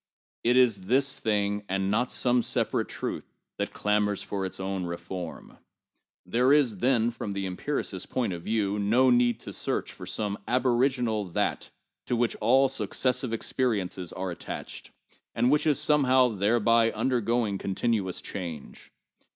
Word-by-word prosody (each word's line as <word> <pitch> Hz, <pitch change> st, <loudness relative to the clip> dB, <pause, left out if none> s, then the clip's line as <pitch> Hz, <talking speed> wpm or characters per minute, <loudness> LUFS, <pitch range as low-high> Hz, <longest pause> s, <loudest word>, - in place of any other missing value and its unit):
It 120 Hz, +2 st, +3 dB
is 110 Hz, -7 st, +3 dB
this 135 Hz, +2 st, +2 dB
thing, 105 Hz, -1 st, 0 dB
and 95 Hz, +1 st, 0 dB
not 125 Hz, +4 st, +1 dB
some 125 Hz, -1 st, +2 dB
separate -, -, 0 dB
truth, -, -, -4 dB, 0.3 s
which -, -, -2 dB
clamors 105 Hz, -1 st, 0 dB
for 95 Hz, -2 st, -3 dB
its 95 Hz, -, -8 dB
own 95 Hz, -1 st, -3 dB
reform. 85 Hz, 0 st, -7 dB, 0.7 s
There 125 Hz, +8 st, +2 dB
is, 125 Hz, -9 st, +3 dB
then, 120 Hz, -1 st, +2 dB
from 110 Hz, -3 st, -5 dB
the 100 Hz, 0 st, -3 dB
empiricist's 95 Hz, 0 st, -3 dB
point 120 Hz, -7 st, -1 dB
of 85 Hz, -, -6 dB
view, 105 Hz, -2 st, 0 dB
no 120 Hz, +6 st, +3 dB
need 120 Hz, -1 st, +3 dB
to -, -, -8 dB
search -, -, -2 dB
for -, -, -10 dB
some 105 Hz, -1 st, -3 dB
aboriginal 125 Hz, -3 st, +1 dB
that 90 Hz, -, -2 dB, 0.4 s
to 125 Hz, -, 0 dB
which 120 Hz, 0 st, 0 dB
all 135 Hz, +3 st, +4 dB
successive 125 Hz, +1 st, -1 dB
experiences 105 Hz, -7 st, -2 dB
are 95 Hz, 0 st, -4 dB
attached, 85 Hz, -, -7 dB, 0.5 s
and 120 Hz, +3 st, +3 dB
which 150 Hz, +2 st, +2 dB
is 150 Hz, -, +4 dB
somehow 130 Hz, -4 st, +4 dB
thereby 115 Hz, +2 st, +3 dB
undergoing 115 Hz, -5 st, 0 dB
continuous 100 Hz, -2 st, -1 dB
change. 85 Hz, -7 st, -7 dB
115 Hz, 145 wpm, -27 LUFS, 100-125 Hz, 0.7 s, all